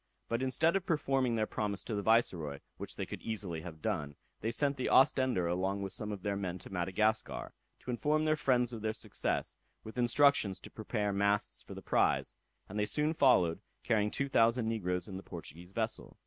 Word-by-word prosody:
But 115 +1 -1
instead 155 +7 +2
of 195 - +1
performing 135 -6 +1
their 110 -1 +1
promise 100 -3 -2
to 115 - -5
the 100 - -1
Viceroy, 90 -10 +2 0.2
which - - -7
they - - -3
could - - -7
easily 100 -7 -3
have 80 -2 -10
done, 75 -10 -2 0.2
they 110 - -1
sent 140 +4 +1
the 130 - -2
Ostender 130 -8 +4
along 95 +3 -1
with 95 - -4
some 105 -1 -2
of 100 -3 -6
their 100 -1 0
men 95 -3 -3
to 95 - -10
Madagascar, 95 +5 0 0.3
to 125 - -4
inform 150 +5 +1
their 155 0 +3
friends 125 -5 +2
of 115 - -6
their 110 0 -1
success, - - -2 0.3
with 110 +3 -7
instructions 120 -5 +4
to - - -11
prepare 105 -2 -2
masts 100 +1 +1
for - - -10
the - - -9
prize; - - +1 0.3
and 105 +2 -4
they 105 - +2
soon 150 +7 +1
followed, 95 - +4 0.2
carrying 105 -3 +2
two 140 +6 -1
thousand 115 -2 +3
negroes 90 -5 -1
in 95 -2 -6
the - - -7
Portuguese 85 -1 -9
vessel. 110 +2 -3
110 Hz, 200 wpm, -33 LUFS, 95-125 Hz, 0.3 s, Ostender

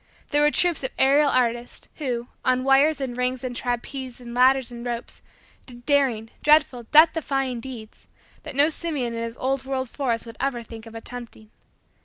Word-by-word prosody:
There 290 0 +2
were 295 - +5
troops 345 -1 +1
of 260 - -1
aerial 285 +2 +4
artists, 240 -1 -1
who, 245 -6 -2 0.2
on 255 0 +2
wires 275 +3 +4
and 260 -3 -3
rings 250 +1 -1
and 250 -1 -4
trapeze 250 +1 -4
and 240 -1 -9
ladders 255 0 +4
and 235 0 -8
ropes, 240 -1 -5 0.5
did 240 -1 -11
daring, 260 -7 +1
dreadful, 295 -5 +3
death 315 +2 +7
defying, 270 -6 -2
deeds, 230 -3 -10 0.3
that 300 -3 -8
no 290 +3 +5
simian 300 -8 -3
in 230 - -4
his 230 0 -4
old 265 0 -1
world 265 -2 -3
forest 245 -5 -1
would 230 -1 -11
ever 265 -3 -1
think 225 0 -11
of 225 - -12
attempting. 225 -2 -9
255 Hz, 180 wpm, -24 LUFS, 240-275 Hz, 0.5 s, death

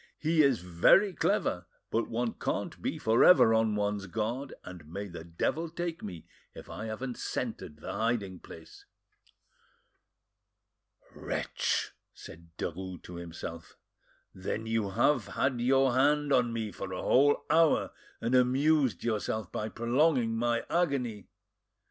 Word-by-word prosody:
He 160 0 +2
is 135 -7 +3
very 90 - +4
clever, 90 - 0 0.2
but 115 - 0
one 115 0 -1
can't - - -4
be - - -2
for 110 +1 +3
ever 180 -11 +7
on 110 -1 +2
one's 105 -1 -1
guard, 115 +7 -3
and 90 -5 -10
may 100 +3 -5
the 85 -3 -9
devil 120 - -2
take 170 0 -4
me 90 -6 -8 0.3
if - - -10
I 110 - -6
haven't 120 +3 -5
scented 75 - -4
the - - -5
hiding 110 -5 -1
place." 80 -1 -13 2.3
"Wretch!" - - -2 0.2
said 85 +1 -12
Derues 90 +2 -5
to 90 - -9
himself, 85 -1 -8 0.6
"then 95 +4 -4
you 110 -2 -1
have 125 +6 +2
had 130 -3 -1
your 135 +1 +3
hand 145 +2 +3
on 120 -2 +3
me 110 -2 -3
for 95 - -7
a 90 - -4
whole 145 +3 +3
hour, 165 -1 +3 0.3
and 115 +2 -2
amused 130 - +3
yourself 110 -3 -2
by 110 - -3
prolonging 120 0 +1
my 115 0 0
agony! 130 - -1
115 Hz, 135 wpm, -30 LUFS, 95-135 Hz, 2.3 s, ever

